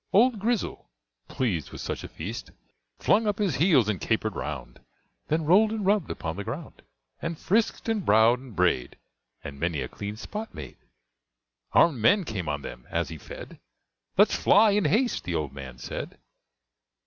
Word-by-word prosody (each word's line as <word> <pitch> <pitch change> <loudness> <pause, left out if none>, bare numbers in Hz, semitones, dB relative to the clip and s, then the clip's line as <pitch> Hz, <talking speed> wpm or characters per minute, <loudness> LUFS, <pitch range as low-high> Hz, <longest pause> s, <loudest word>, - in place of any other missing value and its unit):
Old 230 +2 +4
Grizzle, 225 +1 -2 0.4
pleased 95 - -1
with - - -8
such - - -4
a - - -5
feast, 105 +9 -6 0.5
Flung 220 +1 +3
up 205 -1 0
his 195 -10 0
heels, 145 - +4
and 105 -6 -1
caper'd - - 0
round, 65 -5 -5 0.5
Then 155 +1 0
roll'd 200 +7 +5
and 220 -3 -2
rubb'd 200 -3 +2
upon 80 +1 -4
the 100 - -3
ground, 135 +9 -7 0.4
And 165 -1 -3
frisk'd 220 +8 0
and 220 -3 0
browsed 110 +2 +5
and 130 -6 -12
bray'd, 85 -8 +1 0.5
And 70 -1 -8
many 85 -2 -1
a 65 - -2
clean 105 +8 -6
spot 215 - -6
made. 70 -5 -8 1.0
Arm'd 155 -8 +5
men 200 - +5
came 95 - -4
on 75 -1 -3
them - - -9
as - - -1
he 80 -2 -8
fed: - - -10 0.6
"Let's - - +6
fly," 210 +1 +5
in 205 -3 +2
haste 225 - +2
the 90 -1 -3
old 75 -4 -2
man 65 -3 -8
said. - - -6
125 Hz, 170 wpm, -27 LUFS, -, 1.0 s, Let's